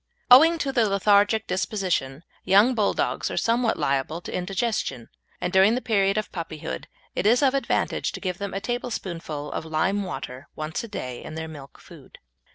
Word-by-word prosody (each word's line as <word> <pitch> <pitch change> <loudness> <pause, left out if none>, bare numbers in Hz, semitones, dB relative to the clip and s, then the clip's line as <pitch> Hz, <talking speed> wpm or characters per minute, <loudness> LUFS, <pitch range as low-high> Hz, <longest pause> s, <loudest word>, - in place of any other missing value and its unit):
Owing 320 +7 +8
to 280 -4 -1
their 235 -4 +2
lethargic 205 +2 +3
disposition, 180 -7 -2 0.2
young 205 +7 +5
Bulldogs 215 -4 0
are - - -5
somewhat 230 0 +1
liable 140 +4 -1
to - - -8
indigestion, 180 - -2 0.3
and 180 - -3
during 195 +4 +5
the - - 0
period 200 -5 +1
of 215 - -2
puppyhood 155 - -6 0.3
it 205 - 0
is 245 +5 +4
of 270 -1 +4
advantage 275 - 0
to - - -6
give 180 -2 -3
them 200 -1 -4
a - - -1
tablespoonful 185 -10 -4
of - - -3
lime 160 +6 0
water 135 -7 -6
once 155 +5 -4
a - - -6
day 125 - -6
in 155 - -8
their 160 0 -4
milk 145 -4 -11
food. - - -15
195 Hz, 175 wpm, -25 LUFS, 160-220 Hz, 0.3 s, Owing